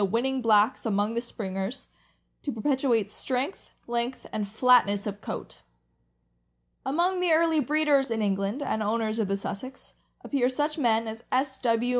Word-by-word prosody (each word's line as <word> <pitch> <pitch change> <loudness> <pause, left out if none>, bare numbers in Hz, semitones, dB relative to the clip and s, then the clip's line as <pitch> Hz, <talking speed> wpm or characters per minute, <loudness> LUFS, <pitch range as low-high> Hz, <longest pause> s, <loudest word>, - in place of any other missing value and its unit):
winning 245 +6 0
blacks 220 0 +3
among 205 0 +1
the 235 - -1
Springers, 200 +1 -5 0.5
to 285 - -3
perpetuate 240 -4 +1
strength, 260 - -3
length, 240 +2 -2
and 210 -2 -2
flatness 210 -2 +4
of 205 -1 -5
coat. - - -7 1.2
Among 345 +7 +1
the 360 -2 +2
early 320 0 +4
breeders 290 -1 +2
(in 225 -2 -1
England) 200 +6 -1
and 220 - -1
owners 220 +1 0
of 215 - +1
the 195 +1 0
Sussex, 230 +7 -7 0.3
appear 255 -3 +1
such 295 +4 -1
men 230 -4 +2
as 220 +1 -7
S. 265 +1 0
W. 235 0 +1
235 Hz, 150 wpm, -27 LUFS, 215-270 Hz, 1.2 s, flatness